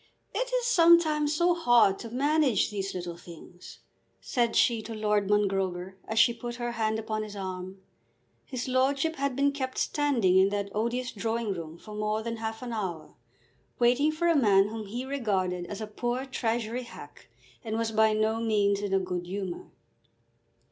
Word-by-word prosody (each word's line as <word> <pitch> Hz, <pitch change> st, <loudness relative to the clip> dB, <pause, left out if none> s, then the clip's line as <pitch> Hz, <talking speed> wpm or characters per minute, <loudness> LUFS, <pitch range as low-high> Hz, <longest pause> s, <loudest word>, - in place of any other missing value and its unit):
It -, -, -2 dB
is -, -, 0 dB
sometimes 330 Hz, -7 st, +4 dB
so 345 Hz, +3 st, +3 dB
hard 240 Hz, -, +4 dB
to 230 Hz, -, -7 dB
manage 275 Hz, -2 st, +2 dB
these 195 Hz, -2 st, -4 dB
"little 175 Hz, -1 st, -5 dB
things," 175 Hz, +1 st, -13 dB, 0.4 s
said 235 Hz, -2 st, 0 dB
she 230 Hz, -2 st, +3 dB
to 225 Hz, +1 st, -7 dB
Lord 210 Hz, -2 st, 0 dB
Mongrober 190 Hz, -3 st, 0 dB
as 220 Hz, -, -4 dB
she 235 Hz, +2 st, +6 dB
put 240 Hz, 0 st, -6 dB
her 240 Hz, 0 st, -3 dB
hand 220 Hz, -2 st, -1 dB
upon 215 Hz, -1 st, -3 dB
his 210 Hz, -1 st, -7 dB
arm. 185 Hz, -1 st, -6 dB, 0.6 s
His 255 Hz, -2 st, -5 dB
lordship 270 Hz, +5 st, +1 dB
had 280 Hz, -1 st, -1 dB
been 280 Hz, +1 st, +2 dB
kept 260 Hz, -2 st, -4 dB
standing 240 Hz, -, +2 dB
in 190 Hz, +1 st, +5 dB
that 200 Hz, -1 st, -3 dB
odious 240 Hz, +4 st, -1 dB
drawing 225 Hz, 0 st, -2 dB
room 165 Hz, -2 st, -7 dB
for 215 Hz, +4 st, -11 dB
more 215 Hz, +1 st, -1 dB
than 230 Hz, 0 st, -4 dB
half 225 Hz, +1 st, -5 dB
an 240 Hz, -2 st, -5 dB
hour 185 Hz, -7 st, -4 dB, 0.6 s
waiting 250 Hz, +5 st, +3 dB
for 330 Hz, +3 st, -1 dB
a 335 Hz, -, +4 dB
man 205 Hz, -7 st, +4 dB
whom 220 Hz, -1 st, -6 dB
he 240 Hz, +6 st, -5 dB
regarded 190 Hz, -10 st, -1 dB
as 205 Hz, +1 st, -6 dB
a -, -, -2 dB
poor 240 Hz, +5 st, -3 dB
Treasury 235 Hz, -2 st, -2 dB
hack, 245 Hz, -, -12 dB, 0.3 s
and 220 Hz, -1 st, -3 dB
was 230 Hz, -1 st, -1 dB
by 220 Hz, 0 st, +4 dB
no 215 Hz, +1 st, +1 dB
means 205 Hz, -3 st, +2 dB
in 200 Hz, -1 st, -1 dB
a -, -, +4 dB
good 180 Hz, -1 st, -4 dB
humour. 190 Hz, -1 st, -5 dB
220 Hz, 175 wpm, -28 LUFS, 200-255 Hz, 0.6 s, she